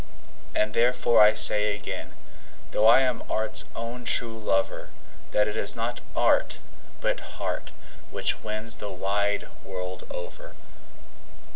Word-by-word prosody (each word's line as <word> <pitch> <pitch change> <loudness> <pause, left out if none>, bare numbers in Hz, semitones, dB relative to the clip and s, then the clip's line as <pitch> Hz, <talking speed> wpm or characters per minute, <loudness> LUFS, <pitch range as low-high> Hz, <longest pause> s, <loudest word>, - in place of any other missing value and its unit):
And 105 0 0
therefore 120 0 +3
I 105 +1 +6
say 105 -1 +7
again, 105 - -7 0.6
though 110 - +3
I 120 +4 +7
am 125 -2 -1
art's 110 0 -1
own 115 +2 -6
true 115 -1 +2
lover, 95 -3 -1 0.4
That 105 0 +1
it 105 - -4
is 100 -2 +2
not 115 +1 -4
art, - - +2 0.4
but - - -1 0.2
heart, - - -4 0.4
which - - -2
wins 110 +1 -1
the 105 - -6
wide 100 +2 -1 0.2
world 90 -1 -7
over. 90 - -9
110 Hz, 130 wpm, -26 LUFS, 105-115 Hz, 0.6 s, say